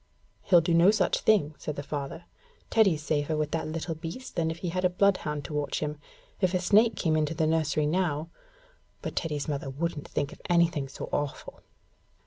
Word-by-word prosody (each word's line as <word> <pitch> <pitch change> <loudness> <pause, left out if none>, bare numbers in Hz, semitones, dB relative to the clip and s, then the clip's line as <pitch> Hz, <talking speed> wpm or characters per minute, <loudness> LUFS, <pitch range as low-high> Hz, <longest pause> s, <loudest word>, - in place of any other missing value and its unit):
'He'll 175 -3 +5
do 165 +1 0
no 170 +3 +6
such 210 -4 +2
thing,' 185 -9 +3
said 150 - -4
the 145 - -5
father. 145 +3 -5 0.5
'Teddy's 190 -9 +3
safer 155 0 0
with 150 -1 -1
that 160 - -2
little 165 +1 -3
beast 165 +11 -7
than 165 -2 +1
if 160 - -4
he - - 0
had 185 +2 -2
a 180 - +4
bloodhound 180 -6 +1
to - - -6
watch 145 -1 -1
him. 150 -1 -3 0.4
If 185 -1 +1
a - - +3
snake 210 +5 +4
came 160 -3 +1
into 155 0 0
the 160 -1 +1
nursery 155 -1 +1
now 165 -1 0 0.3
' - - -35
But - - -4
Teddy's 150 -4 -2
mother 145 -1 -3
wouldn't 150 +2 -3
think 145 -1 -2
of - - -16
anything 170 -5 +2
so 135 - -7
awful. 145 -1 -3
160 Hz, 200 wpm, -28 LUFS, 150-180 Hz, 0.5 s, no